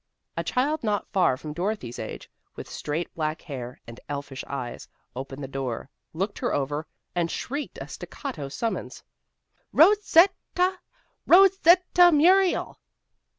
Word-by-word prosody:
A - - -2
child 285 +4 0
not 210 -2 -1
far 180 -9 +3
from 150 +2 -7
Dorothy's 175 - -3
age, - - -7 0.3
with - - -8
straight 155 +4 -4
black 155 0 -3
hair, 125 -5 -7
and 115 0 -11
elfish 140 -2 -5
eyes, 130 -4 -6 0.3
opened 135 +2 -6
the - - -4
door, 135 -2 -4 0.2
looked 195 +5 -3
her - - 0
over, 145 +3 -2 0.3
and 175 -1 0
shrieked 285 - -4
a - - -7
staccato 160 - -7
summons. 225 +11 -4 0.7
"Ro 350 +7 +7
set 370 0 +5 0.2
ta! 365 +1 +1 0.5
Ro 385 +3 +9
set 365 -1 +5
ta 355 0 +8
Muriel!" 360 +4 +3
175 Hz, 145 wpm, -26 LUFS, -, 0.7 s, Ro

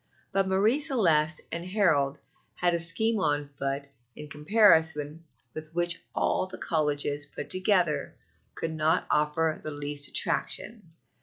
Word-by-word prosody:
But 195 -1 +1
Marie 205 +8 +2
Celeste 170 - +2
and 170 +1 -4
Harold 165 -8 +1 0.4
had 175 -1 +1
a 170 - +1
scheme 210 +7 +1
on 145 -5 0
foot 140 0 -4 0.3
in 150 0 -9
comparison 160 -2 +2 0.3
with 155 +1 -9
which 175 -1 0
all - - +1
the 185 - -9
colleges 145 -2 -1
put 145 - -8
together 185 -4 +1 0.4
could 165 - -3
not 155 0 +1
offer 155 +1 +1
the - - -4
least 145 0 -2
attraction. 210 -8 -2
160 Hz, 135 wpm, -28 LUFS, 150-185 Hz, 0.4 s, Marie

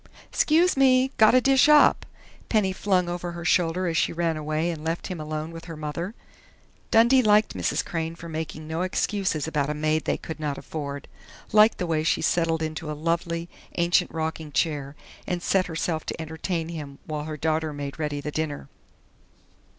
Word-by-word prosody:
"'Scuse 335 +4 +3
me! 265 -1 +4
Gotta 220 +3 +6
dish 270 +3 +4
up!" 300 -1 +5 0.4
Penny 205 -4 +2
flung 185 -2 +1
over 175 0 -4
her 170 -1 -7
shoulder 180 0 +2
as 170 -2 -1
she - - +2
ran 165 -1 0
away 155 +2 -1
and 155 -2 -7
left 165 +1 -2
him 180 -4 -5
alone 155 +1 -4
with 165 0 -9
her 165 -2 -8
mother. 155 +7 -4 0.7
Dundee 235 +4 +5
liked 215 -1 +4
Mrs. - - -1
Crain 165 -2 -3
for 170 - -10
making 155 -1 -5
no 160 +2 -2
excuses 185 -4 -1
about 150 -3 -1
a 150 - -2
maid 155 +1 0
they - - 0
could 160 -1 -7
not 145 -2 -2
afford, 145 -2 -6 0.4
liked 215 +1 +6
the 180 - -2
way 160 -2 0
she 160 - +1
settled 165 -2 +1
into 155 0 -4
a 150 - -4
lovely, 170 +1 -1 0.3
ancient 175 0 +3
rocking 160 -1 -4
chair 145 -2 -1 0.3
and 175 -1 -2
set 190 -1 +2
herself 160 -1 -2
to - - -4
entertain 160 +1 -3
him 150 -4 -7
while 150 -1 -4
her 155 -1 -5
daughter 155 +1 0
made 145 0 -6
ready 150 -2 -2
the 150 - -4
dinner. 150 -2 -3
165 Hz, 180 wpm, -25 LUFS, 155-180 Hz, 0.7 s, Gotta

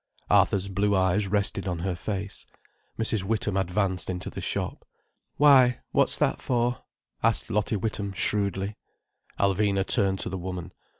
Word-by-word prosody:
Arthur's 100 0 +3
blue 100 +1 +1
eyes 95 +2 +2
rested 100 -1 -1
on 90 -2 -2
her 90 +2 -2
face. 100 +4 -5 0.5
Mrs. 110 -2 0
Witham 105 0 -1
advanced 95 0 -1
into 90 0 -4
the - - -6
shop. - - -3 0.5
"Why? 130 -4 +6
What's - - +2
that - - 0
for?" 120 -1 0 0.4
asked - - +1
Lottie 105 +2 0
Witham 105 -1 -3
shrewdly. 100 +1 0 0.6
Alvina 100 0 +2
turned 100 -5 +3
to - - -3
the 95 0 -4
woman. 90 0 -6
100 Hz, 140 wpm, -26 LUFS, 95-105 Hz, 0.6 s, Why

